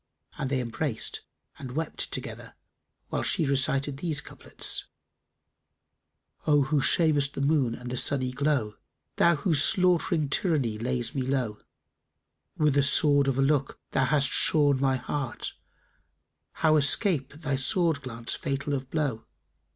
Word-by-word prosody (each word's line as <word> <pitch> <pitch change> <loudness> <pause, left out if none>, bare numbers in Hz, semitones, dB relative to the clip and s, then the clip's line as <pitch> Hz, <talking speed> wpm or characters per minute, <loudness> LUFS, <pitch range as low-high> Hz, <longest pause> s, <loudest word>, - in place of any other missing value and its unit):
And 130 - -2
they 135 -2 0
embraced 115 +1 -3 0.4
and 130 -3 -7
wept 160 +2 -3
together, - - -6 0.6
whilst - - -1
she 160 - +1
recited 135 0 +1
these 155 -1 -2
couplets, - - -5 1.6
"O 145 -2 +4
who 145 +1 0
shamest 145 -4 +3
the - - -4
Moon 140 -5 +1
and 125 0 -8
the 125 - 0
sunny 130 -1 +1
glow: 130 -5 -1 0.2
* - - -53
Thou 170 0 +4
whose 150 0 +1
slaught'ring 175 -4 +3
tyranny 140 - 0
lays 120 0 -2
me 135 - -2
low; 125 -5 -2 1.0
With 150 -2 +2
the 140 - +3
sword 140 0 +4
of 135 -1 0
a 135 - +3
look 140 -1 0
thou 135 - +2
hast 140 0 +2
shorn 145 -4 +4
my 135 -1 +2
heart, 130 -1 -4 0.5
* - - -51
How 155 -1 +5
escape 145 - +2
thy 150 -2 -3
sword 155 +3 +1
glance 115 -3 -4
fatal 140 -2 -3
of 130 -1 -4
blow? 140 -8 -2
140 Hz, 145 wpm, -27 LUFS, 130-150 Hz, 1.6 s, How